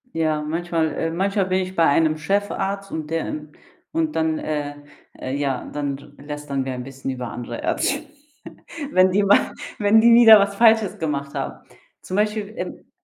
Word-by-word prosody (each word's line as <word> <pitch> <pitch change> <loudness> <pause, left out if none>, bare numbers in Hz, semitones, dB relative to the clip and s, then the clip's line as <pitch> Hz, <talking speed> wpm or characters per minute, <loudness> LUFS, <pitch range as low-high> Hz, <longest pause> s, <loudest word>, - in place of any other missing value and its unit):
Ja, 155 -2 0
manchmal 165 0 -1
äh, 165 - -1
manchmal 195 +2 0
bin 185 0 0
ich 185 0 -4
bei 165 - +4
einem 155 +2 +3
Chefarzt 195 +3 -2
und 155 -1 -5
der, 165 0 -2
ähm 150 0 -6 0.4
und 320 -1 -1
dann, 160 -1 0
äh 145 -1 -3 0.4
äh, 130 +1 -4
ja, 140 -3 -2
dann 140 -2 -2 0.2
r 140 - -14
lästern 145 -2 -4
wir 130 - -3
ein 125 0 -5
bisschen 135 0 -6
über 125 -2 -5
andere 120 -1 -6
Ärzte, 280 - 0 0.9
wenn 185 0 +4
die 200 +2 +2
mal 200 - +4 0.3
wenn 210 +2 +5
die 235 0 +6
wieder 225 -3 +9
was 200 0 0
Falsches 220 -3 +4
gemacht 140 -3 -3
haben. - - -5 0.4
Zum 185 - -6
Beispiel, 210 0 -1
ähm - - -7
165 Hz, 180 wpm, -22 LUFS, 145-200 Hz, 0.9 s, wieder